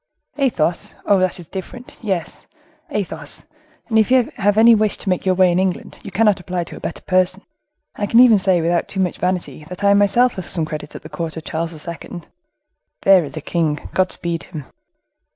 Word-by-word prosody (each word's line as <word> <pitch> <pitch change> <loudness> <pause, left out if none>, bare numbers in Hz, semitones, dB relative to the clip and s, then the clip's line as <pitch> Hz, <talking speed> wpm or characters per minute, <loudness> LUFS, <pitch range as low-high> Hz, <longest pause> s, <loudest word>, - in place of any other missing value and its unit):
"Athos! 175 - 0
Oh! 200 -2 +4
that's 185 -1 -1
different; 200 +8 -9
yes, 190 -8 -4 0.4
Athos—and 220 - -4
if 220 - +3
you 255 -2 +3
have 205 0 +2
any 230 +1 +8
wish 215 -1 +2
to - - -5
make 185 +1 -1
your 185 - +3
way 185 -1 +4
in 175 - +1
England, 190 -1 -2
you - - -8
cannot 210 +1 +2
apply 180 -1 -3
to - - -10
a - - -9
better - - -6
person; 185 +1 +1 0.5
I 205 - -1
can 230 - +4
even 235 -4 +7
say, 185 -2 +2
without 170 +1 +1
too 195 - -6
much 185 -2 0
vanity, 180 -4 -2
that 180 +4 -9
I 200 0 +5
myself 205 +5 +4
have 185 - -5
some 165 -3 -1
credit 150 -1 -7
at - - -9
the - - -10
court 165 -1 -5
of 160 - -6
Charles 165 0 -5
II. 170 +1 -7 0.8
There 195 -2 +6
is 150 +1 -8
a - - -4
king—God 165 +4 -1
speed 170 -1 -3
him!" 150 -4 -8
185 Hz, 195 wpm, -20 LUFS, 170-205 Hz, 0.8 s, any